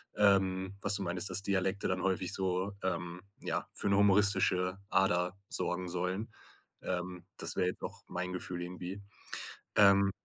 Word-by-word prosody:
ähm, 95 -2 +3
was 105 - +1
du 100 - -1
meintest, 90 +2 -2
dass 95 +2 -1
Dialekte 95 0 +1
dann 90 -1 0
häufig 95 -1 0
so, 95 +1 0
ähm, 90 -1 -2 0.2
ja, - - -1
für 100 - -1
'ne 100 - +4
humoristische 95 -2 +4
Ader 90 -1 +2
sorgen 90 0 -2
sollen. 90 +5 -2 0.5
Ähm, 90 0 -3
das 80 0 0
wäre 90 -1 +2
jetzt 90 - -4
auch - - -5
mein 90 +1 -3
Gefühl 90 -1 -4
irgendwie. 90 +3 -6 0.7
Ähm, 100 -1 +7
95 Hz, 150 wpm, -33 LUFS, 90-100 Hz, 0.7 s, Ähm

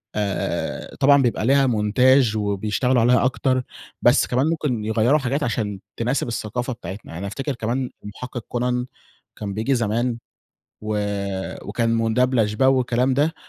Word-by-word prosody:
آآ 100 -3 -2
طبعًا 140 0 +6
بيبقى 120 -4 0
ليها 135 +2 +4
مونتاچ 120 +2 +3
وبيشتغلوا 110 +4 +1
عليها 125 +2 +4
أكتر، 130 0 +1 0.4
بس - - +4
كمان 130 +4 +1
ممكن 135 -9 -1
يغيروا 110 +7 +3
حاجات 140 +2 -1
عشان 105 -6 -2 0.2
تناسب 125 +4 0
الثقافة 120 +2 -3
بتاعتنا. 95 -4 -8
أنا 100 +3 -4
أفتكر 135 +7 -4
كمان 120 +3 -2
المحقق 120 +3 -7
كونان 125 0 -1 0.5
كان 100 -2 -5
بييجي 115 +7 0
زمان، 115 +1 0 0.6
و 110 0 -3 0.7
وكان 115 -1 0
مُدبلچ 115 -2 +1
والكلام 130 -1 +3
ده، 150 +4 +1
120 Hz, 135 wpm, -22 LUFS, 110-130 Hz, 0.7 s, طبعًا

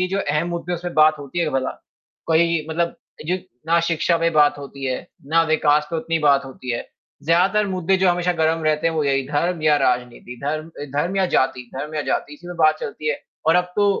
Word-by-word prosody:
लीजिए 185 +2 0
जो - - -1
अहम 165 +3 0
मुद्दे 170 0 -4
हैं 175 - 0
उसमें 175 0 -6
बात 155 0 +5
होती 145 +3 -6
है 170 - +2
क्या 155 - -2
भला? 130 - -2 0.6
कोई 165 -1 +2
मतलब 170 +1 -1 0.3
जो 180 - +1 0.3
ना 170 +1 +4
शिक्षा 170 +1 +2
पे 165 0 +2
बात 145 -2 +4
होती 140 -1 -8
है, 130 -1 -3 0.2
ना 165 +2 +3
विकास 150 -1 +3
पे 165 - -1
उतनी 165 0 -1
बात 140 -2 +3
होती 130 -1 -8
है, 120 - -4 0.4
ज़्यादातर 185 +6 +3
मुद्दे 185 0 +1
जो 190 0 +3
हमेशा 175 0 +1
गरम 160 +1 +2
रहते 155 +1 +1
हैं 165 - +1
वो 155 -2 0
यही 135 -1 +1
धर्म 165 +3 -1
या 150 -1 +4
राजनीति, 125 -2 -1
धर्म 155 +2 -2
अ, - - -4
धर्म 175 +6 0
या 190 -1 +3
जाति 130 -2 0
धर्म 150 +3 -5
या 150 - 0
जाति 145 - -2
इसी 175 +4 -13
में 175 - -7
बात 155 -1 +4
चलती 155 +2 -4
है। 150 - -1 0.3
और 160 - +5
अब 180 0 0
तो 205 0 +4
160 Hz, 235 wpm, -21 LUFS, 145-175 Hz, 0.6 s, बात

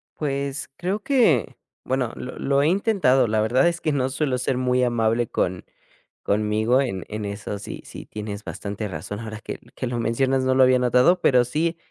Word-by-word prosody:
Pues, 140 -1 -3
creo 190 +4 -2
que, 220 - +2 0.3
bueno, 130 -2 -1
lo 125 - -7
lo 140 0 +2
he 150 - +3
intentado, 185 - +3
la 110 0 +1
verdad 125 +8 +3
es 170 0 -1
que 155 - 0
no 130 -2 0
suelo 135 -2 -1
ser 125 +1 -1
muy 125 0 +1
amable 120 -1 +1
con 90 -2 -1 0.6
conmigo 110 +5 +2
en 95 -9 -3
en 105 0 -5
eso 100 0 -5
sí 100 - -8
sí - - -10
tienes 105 -1 -6
bastante 105 +1 -5
razón, 95 +4 -6
ahora 110 -1 -7
que - - -7 0.2
que 130 - -3
lo 120 - -3
mencionas, 130 +4 +1
no 130 - +2
lo 130 - +4
había 130 0 +5
notado, 125 +8 +4
pero 125 -7 +4
sí, 165 +6 -1
125 Hz, 190 wpm, -23 LUFS, 110-140 Hz, 0.6 s, había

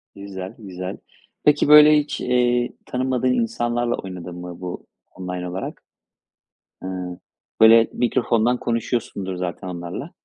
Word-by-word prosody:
Güzel, 95 -2 -7
güzel. 95 -3 -7 0.5
Peki 150 -1 +4
böyle, 150 0 +9
hiç, 145 - -4
eee, 125 -1 +1
tanımadığın 130 0 0
insanlarla 120 - 0
oynadın 90 -2 -7
mı 90 0 -8
bu 90 -1 -6 0.3
online 90 -1 -5
olarak? 95 +2 -5 1.0
Hıı, 90 -1 -5 0.4
böyle, 115 0 +7
mikrofondan 120 -1 +1
konuşuyorsundur 115 -5 -2
zaten 90 +1 -4
onlarla. 90 - -6
110 Hz, 110 wpm, -22 LUFS, 90-125 Hz, 1.0 s, böyle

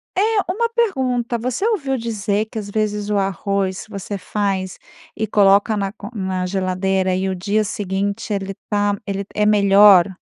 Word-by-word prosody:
É. 375 - +2 0.3
Uma 465 +5 0
pergunta: 260 - 0
você 250 - -2
ouviu 280 - 0
dizer 215 -3 -1
que, 220 - -10
às 205 -1 -7
vezes, 210 0 -2
o 210 - +1
arroz 195 0 -1
você 200 -1 -5
faz 195 -2 -2 0.4
e 220 - -1
coloca 200 +1 +4
na 195 -1 -2 0.2
na 190 -3 -2
geladeira 185 0 0
e 190 +1 -1
o 190 - -2
dia 205 +4 0
seguinte 200 +2 -3
ele 195 -1 -3 0.2
tá 205 -1 +1
ele 200 -1 -3
é 210 - +2
melhor? 200 -3 +6
200 Hz, 155 wpm, -20 LUFS, 195-220 Hz, 0.4 s, melhor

